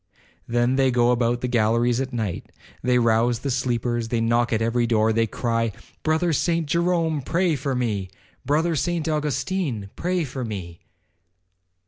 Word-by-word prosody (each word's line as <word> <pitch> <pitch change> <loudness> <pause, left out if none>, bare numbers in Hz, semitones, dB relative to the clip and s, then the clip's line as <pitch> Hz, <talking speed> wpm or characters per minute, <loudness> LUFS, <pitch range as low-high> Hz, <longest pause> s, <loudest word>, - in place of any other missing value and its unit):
Then 120 +2 +1
they 135 -1 +4
go 120 -1 +3
about 120 0 +1
the 125 - -1
galleries 120 +1 +2
at 135 0 -3
night, 110 -8 -4 0.3
they 125 0 +2
rouse 115 0 +3
the 140 - -2
sleepers, 120 -2 -1
they 115 0 -1
knock 115 +1 +1
at 110 - +2
every 115 +1 +1
door,—they 110 0 +2
cry, 115 0 -1 0.3
'Brother 160 +2 +1
Saint 165 +2 +1
Jerome, 165 -1 +1
pray 170 +4 +1
for 135 -1 -2
me,—Brother 115 - -2
Saint 165 +2 -1
Augustine, 150 - -2
pray 180 0 -1
for 130 -2 -5
me.' 95 -7 -6
120 Hz, 145 wpm, -23 LUFS, 115-150 Hz, 0.3 s, they